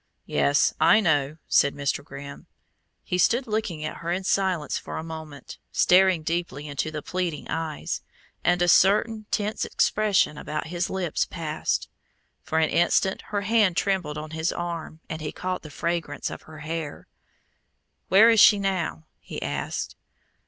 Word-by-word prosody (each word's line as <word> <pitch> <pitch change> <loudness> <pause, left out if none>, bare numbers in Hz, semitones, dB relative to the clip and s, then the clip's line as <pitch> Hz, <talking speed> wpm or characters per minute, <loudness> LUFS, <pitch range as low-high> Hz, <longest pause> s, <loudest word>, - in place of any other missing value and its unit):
"Yes, 145 +1 +2
I 215 - +7
know," 150 -6 +1
said 140 - +3
Mr. 140 0 -1
Grimm. 140 0 -10 0.6
He 180 - -2
stood 240 +8 +3
looking 210 -8 -2
at 155 - -5
her 170 +1 -4
in 185 +2 -1
silence 185 -5 0
for - - -7
a 160 - -4
moment, 160 -3 -9
staring 185 -2 +4
deeply 160 -3 -3
into 145 +2 -2
the 155 -2 -6
pleading 180 -5 -3
eyes; 160 -1 -3 0.4
and 175 0 +3
a - - +2
certain 210 +4 +4
tense 210 +1 -1
expression 205 -8 +2
about 150 0 -4
his 175 +1 -1
lips 185 -4 -1
passed. 160 -3 -2 0.5
For 160 - -2
an 160 -1 +2
instant 175 +3 +2
her 205 -1 -1
hand 210 -4 +2
trembled 180 -7 0
on 155 +1 -6
his 160 +1 -1
arm, 170 -2 -5
and 160 0 -5
he 150 - -4
caught 185 0 -3
the 155 - -10
fragrance 165 -1 -3
of - - -8
her 155 -1 -11
hair. 160 -1 -5 1.0
"Where 215 +5 +7
is 225 - +4
she 205 - +8
now?" 185 -5 -2
he - - -7
asked. - - -3
170 Hz, 160 wpm, -25 LUFS, 155-190 Hz, 1.0 s, she